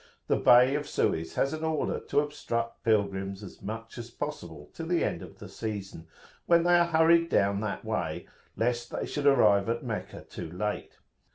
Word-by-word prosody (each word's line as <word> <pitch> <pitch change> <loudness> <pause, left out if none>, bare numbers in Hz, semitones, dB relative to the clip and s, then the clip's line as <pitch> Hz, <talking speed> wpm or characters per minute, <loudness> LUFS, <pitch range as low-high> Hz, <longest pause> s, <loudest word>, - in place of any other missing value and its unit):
The - - +2
Bey 125 +2 +6
of 145 0 -2
Suez 80 0 -1
has 135 - +1
an 155 0 -5
order 160 -1 -1
to - - +1
obstruct 115 -6 -4
pilgrims 100 -2 0
as 100 - -11
much 115 +3 -7
as 120 0 -7
possible 85 - -7
till 165 - -6
the 175 0 +1
end - - -2
of - - -11
the - - -10
season, 100 -6 -6 0.4
when 170 -1 +5
they 175 0 +3
are 170 - +3
hurried 165 0 +4
down 100 -4 +2
that 110 -2 -4
way, - - -2 0.3
lest 120 +2 0
they - - -3
should 145 -1 -1
arrive 105 -7 +5
at 115 +1 -1
Meccah 115 -4 -5
too 80 - -8
late. 105 +4 -4
115 Hz, 185 wpm, -28 LUFS, 100-150 Hz, 0.4 s, Bey